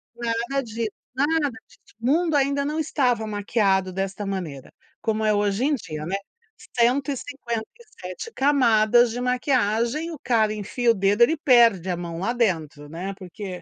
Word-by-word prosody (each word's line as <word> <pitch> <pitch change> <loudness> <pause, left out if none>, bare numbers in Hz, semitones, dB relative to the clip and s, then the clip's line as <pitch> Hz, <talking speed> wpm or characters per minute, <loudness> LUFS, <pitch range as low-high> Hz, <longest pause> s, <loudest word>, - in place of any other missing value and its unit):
Nada 235 +3 -1
di 225 0 -3 0.3
nada 295 +1 +2 0.2
di - - -22 0.2
o - - -5
mundo 320 +3 +2
ainda 280 0 +2
não 305 +2 -2
estava 250 -7 +1
maquiado 200 -2 +1
desta 195 +2 -3
maneira, 170 -9 -5 0.3
como 220 -1 -1
é 215 - +3
hoje 205 +4 +1
em 295 -1 +2
dia, 155 - -6
né. 190 +4 -2 0.6
157 260 - -2
camadas 240 -4 +4
de 245 - -4
maquiagem, 250 +3 0
o 315 - -7
cara 220 -3 +2
enfia 230 +3 0
o - - +3
dedo, 200 +2 +1
ele 320 +6 +3
perde 235 - +4
a 175 - -1
mão 170 -1 -5
lá 230 +6 -1
dentro, 160 -10 -1
né. 185 +5 -5
Porque, 185 -1 -8
230 Hz, 155 wpm, -24 LUFS, 195-265 Hz, 0.6 s, camadas